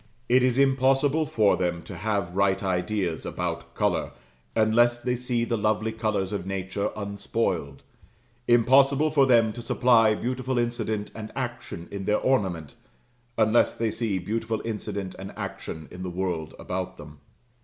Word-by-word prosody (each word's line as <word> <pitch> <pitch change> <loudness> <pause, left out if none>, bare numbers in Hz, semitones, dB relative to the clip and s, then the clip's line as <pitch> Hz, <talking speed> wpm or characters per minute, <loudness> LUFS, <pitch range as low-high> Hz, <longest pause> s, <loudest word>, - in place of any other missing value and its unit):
It 125 +2 +5
is 125 0 +2
impossible 135 +3 +3
for 105 -6 +3
them 85 -2 -1
to 100 - -9
have 100 -1 -2
right 100 0 +2
ideas 90 -2 -1
about - - -4
colour, - - 0 0.4
unless 120 +2 +4
they 125 +1 -1
see 125 -1 -1
the 115 -1 -1
lovely 110 +1 +1
colours 110 -3 -1
of 100 - -2
nature 95 +1 -2
unspoiled; 100 -8 -2 0.6
impossible 135 +5 +5
for 140 -3 +4
them 115 -3 +4
to 120 - -7
supply 115 -2 +4
beautiful 130 +2 -2
incident 115 -3 -1
and 110 -1 -7
action 120 -9 -5
in 100 -1 -5
their 105 - +2
ornament, 95 - 0 0.6
unless 110 +1 +3
they 115 -1 -1
see 110 -5 -1
beautiful 110 +3 -2
incident 105 -4 -4
and 95 +1 -7
action 80 -2 -6
in 90 - -9
the 90 - -3
world 90 -3 -3
about 90 0 -4
them. 75 -1 -12
110 Hz, 150 wpm, -26 LUFS, 95-120 Hz, 0.6 s, It